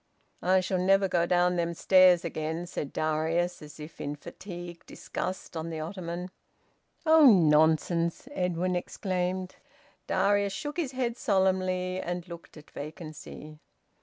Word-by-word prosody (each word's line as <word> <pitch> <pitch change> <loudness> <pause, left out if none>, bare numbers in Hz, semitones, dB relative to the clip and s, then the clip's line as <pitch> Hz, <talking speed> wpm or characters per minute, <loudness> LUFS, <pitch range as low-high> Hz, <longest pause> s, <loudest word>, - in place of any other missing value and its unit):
"I 185 +1 +3
shall 185 0 -1
never 195 +2 +3
go 175 -2 +1
down 180 0 +2
them 170 0 -1
stairs 185 -1 +5
again," 160 +1 -3
said 150 -5 -5
Darius, 160 +3 -1
as 150 +1 -12
if 150 +2 -10
in 145 - -3
fatigued 175 +2 -9
disgust, 185 -1 -5
on 160 +1 -4
the 160 -1 -5
ottoman. 175 +1 -5 0.7
"Oh, 315 -2 +7
nonsense!" 165 +2 +3
Edwin 180 - -1
exclaimed. 185 0 -3 0.5
Darius 200 0 +2
shook 295 - -5
his 295 -7 -2
head 245 -2 -2
solemnly, 185 -5 +1
and 175 0 -4
looked 170 -1 -11
at 155 - -15
vacancy. 155 0 -9
180 Hz, 135 wpm, -28 LUFS, 165-185 Hz, 0.7 s, Oh